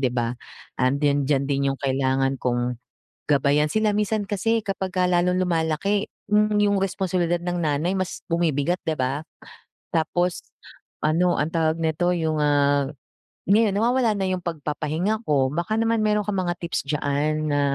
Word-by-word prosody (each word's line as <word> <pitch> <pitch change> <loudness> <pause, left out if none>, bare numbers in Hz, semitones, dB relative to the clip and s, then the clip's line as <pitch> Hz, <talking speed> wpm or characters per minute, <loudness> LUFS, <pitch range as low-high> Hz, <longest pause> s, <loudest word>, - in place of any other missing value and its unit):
di 130 - +2
ba? 120 -1 -1 0.5
'Andiyan-diyan 140 +1 +2
din 140 -1 0
yung 135 - -8
kailangan 135 0 +1
kong 120 0 -1 0.5
gabayan 145 +1 +3
sila. 215 +2 +2
Minsan 210 0 0
kasi 225 +3 +1
kapag 195 -1 -3
ka 180 - +3
lalong 180 +1 +2
lumalaki, 180 +4 0 0.2
hmm, 210 0 +3
yung 205 -1 +3
responsibilidad 180 -3 0
ng 175 0 -3
nanay 155 +3 0
mas 185 -1 -3
bumibigat 170 0 0
di 160 -1 -1
ba? 130 +3 -1 0.7
Tapos 175 +2 0 0.6
ano 175 +3 +3
ang 150 - 0
tawag 160 -1 +1
neto, 160 +3 +1
yung, 160 -2 -1
ah, 145 -1 +3 0.6
ngayon 210 +1 +4
nawawala 235 +2 +2
na 195 -2 -1
yung 185 -1 -2
pagpapahinga 165 +6 -2
ko. 135 -3 +2
Baka 170 +8 -2
naman 225 -1 +1
mayro'n 210 0 +2
kang 200 -2 -1
mga 175 0 -1
tips 170 -4 -3
diyan 150 +1 -1
na 145 0 +2
165 Hz, 150 wpm, -24 LUFS, 145-190 Hz, 0.7 s, ngayon